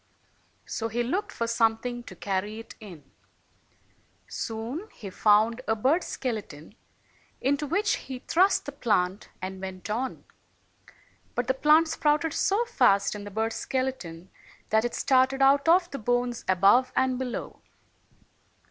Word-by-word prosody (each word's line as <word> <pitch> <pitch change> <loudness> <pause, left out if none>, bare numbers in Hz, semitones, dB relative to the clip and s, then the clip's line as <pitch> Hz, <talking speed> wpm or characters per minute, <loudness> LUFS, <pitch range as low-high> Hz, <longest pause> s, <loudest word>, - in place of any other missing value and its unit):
So 225 - -3
he 235 +2 -1
looked 400 - -2
for 230 - -2
something 230 +1 0
to 185 - -10
carry 200 +3 -3
it 225 - -10
in. 185 -9 -11 1.2
Soon 240 - -5
he 200 -4 -8
found 220 +4 +3
a 220 - +2
bird's 270 +11 +1
skeleton, 210 - -5 0.7
into 285 +2 0
which 400 +7 +1
he 260 -1 -7
thrust 365 +9 +2
the 285 - -5
plant, 205 -8 -1
and 190 0 -5
went 190 +1 -6
on. 255 +4 -3 1.1
But 245 - 0
the 260 - +1
plant 305 +4 +4
sprouted 300 0 +1
so 415 +4 +1
fast 200 - +3
in 205 -1 -7
the - - -6
bird's 220 +2 -2
skeleton, 195 -10 -4 0.4
that 220 +1 +3
it 240 - -2
started 265 +1 +3
out 280 +3 +4
of 350 +1 +4
the 275 - -5
bones 245 +1 -1
above 200 +8 +4
and 260 -1 +1
below. 255 -2 -5
240 Hz, 140 wpm, -27 LUFS, 210-275 Hz, 1.2 s, plant